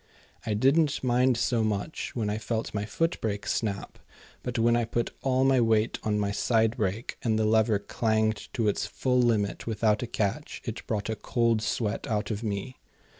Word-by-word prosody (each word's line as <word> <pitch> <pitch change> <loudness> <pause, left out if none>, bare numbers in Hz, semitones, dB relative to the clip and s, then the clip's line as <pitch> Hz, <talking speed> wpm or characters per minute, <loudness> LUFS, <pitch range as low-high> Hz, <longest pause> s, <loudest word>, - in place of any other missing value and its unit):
I 105 - +1
didn't 140 +7 +3
mind 125 0 +3
so 120 -1 +1
much 110 +7 -3
when 110 -4 -1
I 105 +1 -1
felt 115 0 -3
my 100 0 -2
footbrake 115 -7 -1
snap, 100 -3 -2 0.4
but 125 0 -4
when 115 +1 +4
I 120 - +2
put 115 +1 -2
all 130 -1 +2
my 135 -2 +4
weight 110 -1 +2
on 105 -1 0
my 100 -1 0
side 110 +2 +2
brake, 105 +1 -2
and 110 -2 +1
the 110 - +2
lever 110 0 +3
clanged 110 +1 -1
to 115 -3 0
its 105 - 0
full 125 -1 0
limit 110 -4 0
without 110 0 +1
a 125 - -3
catch, 100 -3 -2
it - - -6
brought 105 +1 -2
a - - -1
cold 115 0 +1
sweat 110 -1 -2
out 105 -1 -1
of 105 0 -3
me. 105 +3 -4
110 Hz, 185 wpm, -28 LUFS, 105-120 Hz, 0.4 s, when